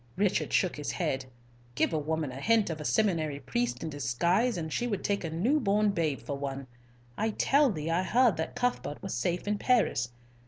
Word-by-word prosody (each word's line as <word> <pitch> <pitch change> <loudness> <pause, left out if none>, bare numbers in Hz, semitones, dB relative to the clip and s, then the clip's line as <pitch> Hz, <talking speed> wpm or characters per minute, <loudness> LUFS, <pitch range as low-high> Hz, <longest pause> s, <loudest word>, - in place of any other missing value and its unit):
Richard 200 -1 +1
shook 185 -5 +1
his 145 - -3
head. 135 -7 -1 0.5
"Give - - +1
a 155 - +1
woman 155 -1 -2
a 130 +2 -7
hint 220 -2 +3
of 155 -1 -5
a - - -6
seminary 160 -10 +1
priest 120 -1 -2
in 160 - -4
disguise, 170 - +1
and 160 -2 -4
she 245 - 0
would 205 -5 -2
take 200 -2 0
a 165 - -2
new 215 - +1
born 210 -3 +2
baby 160 -7 -1
for 140 - -5
one. 140 -1 -4 0.5
I 220 - +1
tell 275 +6 +3
thee 160 -5 -3
I 170 +2 +2
heard 235 +1 +3
that 160 - -3
Cuthbert 245 - -1
was - - -4
safe 170 - -1
in 210 0 0
Paris. 215 - +2
170 Hz, 205 wpm, -29 LUFS, 145-210 Hz, 0.5 s, hint